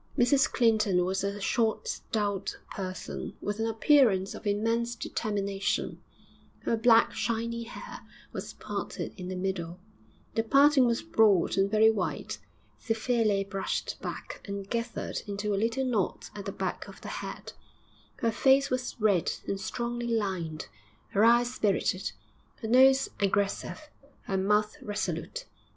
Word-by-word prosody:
Mrs 265 +3 +4
Clinton 215 -7 +3
was 190 +1 -1
a 200 +1 -2
short, 220 +2 0
stout 200 -3 -2
person, 185 -2 -5
with 205 +1 -3
an 225 - +1
appearance 225 -5 +4
of - - -7
immense 230 +3 0
determination; 200 -3 -2 0.6
her - - +1
black, 225 0 +5
shiny 230 +1 -2
hair 235 - -9 0.3
was - - -5
parted - - -5
in 180 -2 -7
the 185 - -4
middle 180 -2 -3 0.5
the 225 - +2
parting 275 +2 +5
was 235 0 0
broad 215 - +3
and 195 0 +2
very 220 +1 +5
white 200 -5 -3 0.4
severely 225 -3 +1
brushed 195 0 -3
back - - -6
and 200 -1 -6
gathered 235 0 -3
into 205 +1 -2
a - - +2
little 235 +4 0
knot 220 -7 -1
at 200 -1 -7
the 195 - -3
back - - -4
of - - -12
the - - -7
head; - - -7 0.6
her 230 - 0
face 270 +4 +4
was 255 -1 -2
red 205 -6 +3 0.2
and 195 0 -2
strongly 240 0 -3
lined, 190 -9 -2 0.4
her 205 - +2
eyes 240 +2 +5
spirited, 195 - 0 0.5
her - - -2
nose 265 +3 +6
aggressive, 200 +9 -1 0.4
her 195 - -3
mouth 210 +2 +2
resolute. 210 - -3
215 Hz, 140 wpm, -29 LUFS, 195-235 Hz, 0.6 s, nose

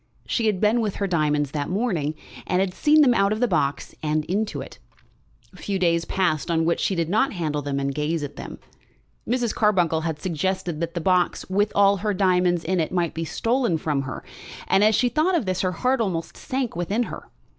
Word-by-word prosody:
She 230 -2 0
had 205 -4 +1
been 220 +3 +3
with 210 -3 -2
her 200 - -1
diamonds 150 -5 +1
that 145 -1 -3
morning, 180 -7 -1 0.3
and 180 - +1
had 190 -1 0
seen 305 +8 +4
them 260 -4 +5
out 200 -3 +2
of 215 - -1
the 245 - +2
box 145 -8 -1
and 155 0 0
into 210 +4 -2
it. - - -9 0.7
Few 200 -1 -3
days 170 -2 +1
passed 175 -5 0
on 165 -1 +1
which 170 0 +1
she 195 - 0
did 170 -2 0
not 220 +9 +1
handle 155 -5 -2
them 140 -1 -2
and 140 0 -1
gaze 150 +2 -1
at 145 - -6
them. - - -8 0.7
Mrs. 240 -1 0
Carbuncle 175 -7 +2
had 160 -2 -3
suggested 180 0 -2
that 170 0 -3
the 170 - -2
box, 180 +1 +1
with 205 +2 +2
all 200 0 +5
her 210 +1 -1
diamonds 180 -2 +2
in 185 +2 0
it, 160 - -1
might 175 -3 0
be 165 0 -3
stolen 235 - 0
from 150 -3 -1
her, 130 -1 -6 0.4
and 195 - +4
as 215 0 +5
she 250 - +3
thought 310 +8 +1
of 315 - 0
this 185 -1 -1
her 185 - 0
heart 250 +7 0
almost 170 -6 -2
sank 255 -5 -3
within 195 +7 0
her. - - -8
185 Hz, 215 wpm, -24 LUFS, 160-210 Hz, 0.7 s, them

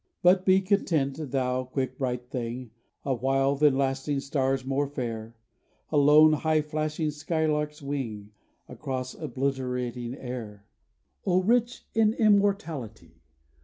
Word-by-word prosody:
But 185 +1 +5
be 190 +1 +6
content, 165 -8 +1
thou 130 -1 0
quick 130 0 -4
bright 125 -2 -3
thing 120 -2 -4 0.3
A 135 - +1
while 135 +3 +1
than 145 -1 +4
lasting 135 +1 0
stars 135 -2 -1
more 135 +2 0
fair: 115 -5 -5 0.6
A 155 - +2
lone 150 +2 +7
high 155 0 +1
flashing 155 0 -2
skylark's 150 -1 -1
wing 115 -8 -4 0.4
Across 130 -3 -5
obliterating 125 -3 -3
air. 115 -7 -7 0.6
O 185 0 +2
rich 240 +3 +1
in 220 0 +3
immortality! 165 - 0
135 Hz, 120 wpm, -27 LUFS, 125-155 Hz, 0.6 s, lone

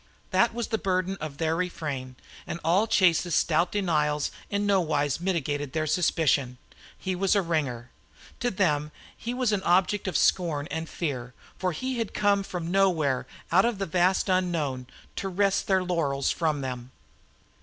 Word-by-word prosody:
That 235 - +4
was 235 0 -4
the 220 - 0
burden 185 0 0
of 150 -2 -5
their 160 0 0
refrain, 150 -7 -3 0.3
and 170 - -4
all 180 +7 +3
Chase's 175 -5 +3
stout 170 +2 +2
denials 150 -7 0 0.2
in 205 0 0
no 200 -2 +3
wise 145 -3 0
mitigated 145 -6 -2
their 155 -1 0
suspicion. 150 -5 +1 0.4
He 185 -1 -3
was 195 +2 +2
a 200 - +3
"ringer." 135 -8 -2 0.5
To 245 - +1
them 150 -7 0 0.2
he 235 - -5
was 250 -3 +1
an 205 -2 +1
object 190 +3 +2
of 180 - 0
scorn 155 -5 +1
and 160 0 -3
fear, 130 -7 -4 0.2
for 185 -1 0
he 255 +8 -3
had 225 -3 -3
come 205 -1 +3
from 180 -3 -4
somewhere 165 -9 +2 0.2
out 185 +3 +5
of 235 -3 0
the 195 - -2
vast 185 +3 +2
unknown 165 -9 0 0.3
to 195 - -2
wrest 195 +1 +1
their 190 -2 +3
laurels 150 -6 0
from 155 -4 0
them. 125 -2 -5
170 Hz, 165 wpm, -27 LUFS, 150-190 Hz, 0.5 s, out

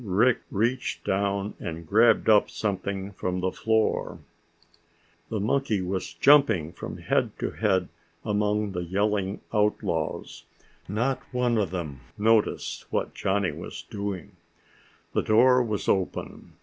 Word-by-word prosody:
Rick 115 +5 +3
reached 120 +5 -1
down 100 +1 -1
and 85 0 -6
grabbed 110 +5 +4
up 105 -2 +5
something 100 -1 -3
from 90 -1 -3
the 90 0 0
floor. 110 +2 0 1.1
The 110 - -2
monkey 110 +1 +1
was 90 -2 -3
jumping 110 - +5
from - - -7
head - - 0
to - - -2
head 95 -5 +1 0.4
among 105 0 0
the 90 -1 -3
yelling 100 +2 -1
outlaws. 105 -1 -1 0.4
Not 120 +7 0
one 125 -2 +1
of 100 -5 0
them 80 -7 -5 0.2
noticed 110 0 +1
what - - -1
Johnny 95 -1 0
was - - -8
doing. 100 -4 -4 0.8
The - - +2
door 125 +4 +5
was 110 -4 -2
open. 95 -2 -2
105 Hz, 125 wpm, -26 LUFS, 95-110 Hz, 1.1 s, up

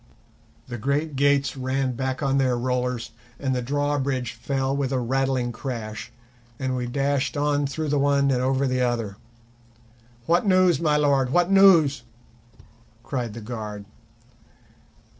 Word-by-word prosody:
The 120 -2 -6
great 140 +5 -1
gates 140 +1 +2
ran 130 0 -1
back 130 +2 -3
on 135 0 +2
their 130 -2 +2
rollers, 125 -1 -2 0.3
and 130 -1 -1
the 125 - -1
drawbridge 140 -2 -1
fell 135 +3 -2
with 140 -2 -1
a 130 - +1
rattling 130 0 0
crash, 115 -3 -6 0.5
and 130 -1 -2
we 125 -1 -2
dashed 140 +3 -1
on 145 -1 +1
through 155 +2 -3
the 145 0 +1
one 140 0 +2
and 125 -1 +1
over 135 +1 +1
the 130 -1 0
other. 115 -5 -1 1.1
"What 170 +2 +3
news, 185 -2 +4
my 150 -2 +2
lord, 140 -3 +2
what 175 +6 +2
news?" 170 -9 +6 1.0
cried 120 -4 -4
the 115 - -7
guard. 105 -3 -6
135 Hz, 140 wpm, -24 LUFS, 125-145 Hz, 1.1 s, news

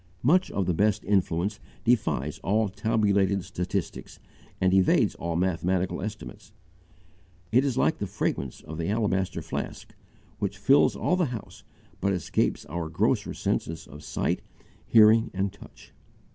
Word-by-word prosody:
Much 180 +9 +4
of 100 - -1
the 90 - +1
best 105 +4 +1
influence 95 0 0 0.2
defies 105 - +1
all 105 +3 +1
tabulated 100 -2 +1
statistics 95 -1 -4 0.4
and 95 0 +2
evades 95 -1 +4
all 85 0 -4
mathematical 90 +1 0
estimates; 105 0 -8 1.0
it 125 +4 +4
is 135 -4 -1
like - - +2
the - - -2
fragrance 70 -2 -3
of 80 +1 -8
the 85 - -2
alabaster 100 -4 0
flask - - -6 0.5
which 100 +1 -2
fills 135 +7 +4
all 180 - +1
the 180 -2 +2
house 120 -6 -7 0.4
but 100 +1 +1
escapes 90 -4 -1
our 80 +2 -4
grosser 80 - 0
senses 80 0 -2
of 75 +2 -12
sight, - - -1 0.5
hearing, 110 +1 +6
and 95 +1 -1
touch. 100 - -16
100 Hz, 140 wpm, -27 LUFS, 90-110 Hz, 1.0 s, hearing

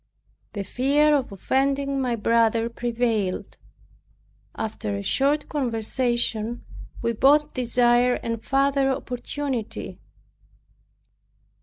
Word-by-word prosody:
The 200 -2 -3
fear 285 +8 +2
of 265 -6 -1
offending 275 +6 0
my 245 -2 0
brother 230 +1 +2
prevailed. 230 -5 -2 1.0
After 105 - -3
a 100 - -4
short 285 - +1
conversation 240 -3 -1 0.4
we 230 0 +1
both 295 +6 +4
desired 245 0 +2
a 230 -1 -2
farther 275 +2 +1
opportunity. 255 -1 -4
245 Hz, 90 wpm, -24 LUFS, 230-275 Hz, 1.0 s, both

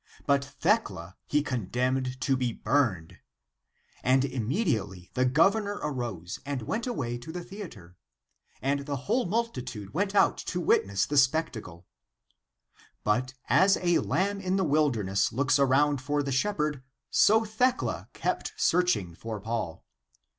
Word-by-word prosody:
But 140 0 +3
Thecla 140 - -1
he 150 0 +2
condemned 125 +2 -1
to 135 - +2
be 125 -3 -1
burned. 110 - 0 0.8
And 130 +1 +3
im 125 -5 -3
mediately 105 - -1
the 130 - +2
governor 195 +10 +3
arose 115 - -4
and 140 -4 -4
went 225 - -2
away 120 - -3
to 140 +7 -8
the 175 +1 -5
theatre. 170 - -10 0.7
And 140 +1 0
the 145 - -1
whole 245 - +1
multitude 125 - -3
went 200 +5 -1
out - - +4
to 180 - -3
wit 160 - +3
ness 100 -1 0
the 145 - -2
spectacle. 130 - +1 1.2
But 125 +5 0
as 195 +1 +5
a 175 -1 +2
lamb 200 +1 0
in 185 0 0
the 195 - +2
wilderness 135 - +1
looks 140 +4 +2
around 140 +1 +3
for 145 +2 0
the 140 - -3
shepherd, 150 -1 0 0.3
so 220 +2 +5
Thecla 245 +4 0
kept - - -2
searching 165 - +2
for 110 +4 -6
Paul. 110 -5 -4
140 Hz, 140 wpm, -28 LUFS, 115-175 Hz, 1.2 s, as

